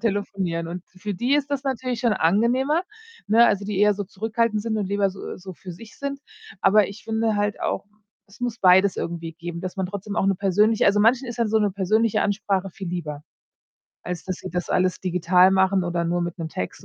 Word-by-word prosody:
telefonieren. 195 -6 -2
Und 180 +1 -6
für 195 +3 -6
die 245 +9 +1
ist 285 -1 0
das 280 -1 -2
natürlich 255 -2 -2
schon 235 -3 +2
angenehmer, 245 - +2 0.4
ne? 225 +3 +6
Also, 200 -2 +1
die 210 -2 -2
eher 210 +1 +5
so 205 0 -4
zurückhaltend 215 +2 -1
sind 225 0 -2
und 205 - -1
lieber 200 -1 +1
so 195 - -8
so 185 0 -9
für 180 +1 -10
sich 215 +5 -13
sind. 280 0 -4 0.4
Aber 210 0 +5
ich 200 +2 -11
finde 220 -1 0
halt 205 0 -1
auch, - - -2
äh, - - -36 0.4
es 200 +3 -19
muss 240 -2 -2
beides 190 +1 +5
irgendwie 165 -1 -4
geben, 170 +1 -7
dass 185 +1 -6
man 190 - -1
trotzdem 200 +2 -5
auch - - +2
'ne 195 0 +3
persönliche 205 +4 +2
also, 200 +1 +4
manchen 240 +4 +3
ist 235 - -7
dann 230 -2 +1
so 220 - +3
'ne 210 -1 +2
persönliche 215 +3 +1
Ansprache 195 -2 -1
viel 190 +1 -7
lieber, 155 -4 -5 0.8
als 180 -1 -5
dass 185 -1 -3
sie 185 - -7
das 180 0 -3
alles 185 -1 +1
digital 180 +1 +4
machen 190 -1 +3
oder 175 -1 -1
nur 175 +1 0
mit 175 0 -3
'nem 160 -1 -4
Text 90 -11 -6
200 Hz, 220 wpm, -23 LUFS, 180-220 Hz, 0.8 s, ne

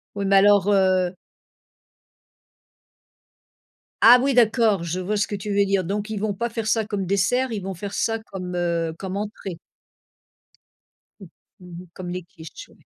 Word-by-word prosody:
Oui, 200 -1 -3
mais 195 0 +4
alors, 200 0 +5
heu 185 -2 +2 2.9
Ah 240 +2 +9
oui, 275 +1 +1
d'accord, 220 -6 +3
je 175 +2 -3
vois 210 +4 -2
ce 205 - 0
que 205 - -4
tu 200 +1 -7
veux 200 0 +3
dire. 195 -1 +1
Donc 205 +4 -3
ils 220 - -4
vont 215 -1 -1
pas 235 +5 -3
faire 225 -1 -4
ça 220 -1 +1
comme 205 -3 -3
dessert, 235 +7 +1
ils 215 - -3
vont 190 +1 -5
faire 200 +3 -7
ça 225 +2 0
comme, 185 -4 -7
heu, 170 -2 -1
comme 190 +1 -5
entrée. 200 -4 -6 1.6
Mmh. 190 -4 -12 0.3
Mmh 180 -1 -11
mh, - - -18
comme 180 -1 -7
les 180 0 -5
quiches, 165 -3 -13
ouais. - - -23
195 Hz, 170 wpm, -23 LUFS, 185-215 Hz, 2.9 s, Ah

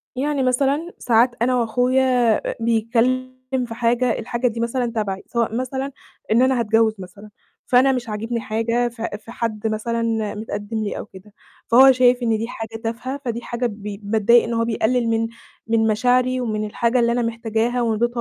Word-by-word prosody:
يعني 280 +1 0
مثلًا 275 +7 0
ساعات 235 +1 +3
أنا 250 +1 +2
وأخويا 245 0 +2 0.2
أ - - -8
بيتكلِّم 235 +3 0 0.3
في 230 - -7
حاجة، 240 +1 +1
الحاجة 240 +2 -1
دي 230 -1 -3
مثلًا 240 +2 -1
تبعي، 195 -3 -2
سواء 230 -1 -1
مثلًا 265 +2 -3 0.4
إن 230 +3 +4
أنا 260 -1 +3
هاتجوِّز 225 0 +2
مثلًا، 190 +3 -11 0.4
فأنا 255 +2 +4
مش 245 -3 -3
عاجبني 225 +3 -3
حاجة 230 +2 0
في 230 -1 -5
في 225 +2 -13
حد 220 -2 -3
مثلًا 225 -1 -1
مِتقدِّم 210 0 -5
لي 205 - -3
أو - - -6
كده، 200 +1 -15 0.3
فهو 265 +3 +8
شايف 250 -1 +3
إن 225 -2 +2
دي 225 - -3
حاجة 225 -1 -7
تافهة، 255 +5 -4
فدي 235 -1 -3
حاجة 240 +1 -3
بي 205 -2 -5
باتضايق 220 +3 +4
إن 235 - -3
هو 230 0 +1
بيقلِّل 235 +1 0
من 225 0 +1 0.4
من 225 0 +2
مشاعري 250 +3 +2
ومن 215 -3 -2
الحاجة 235 +4 0
اللي 235 0 +2
أنا 245 +1 +1
محتاجاها 230 +1 -1
وإن 225 -2 0
ده 240 - +3
230 Hz, 180 wpm, -21 LUFS, 220-250 Hz, 0.4 s, فهو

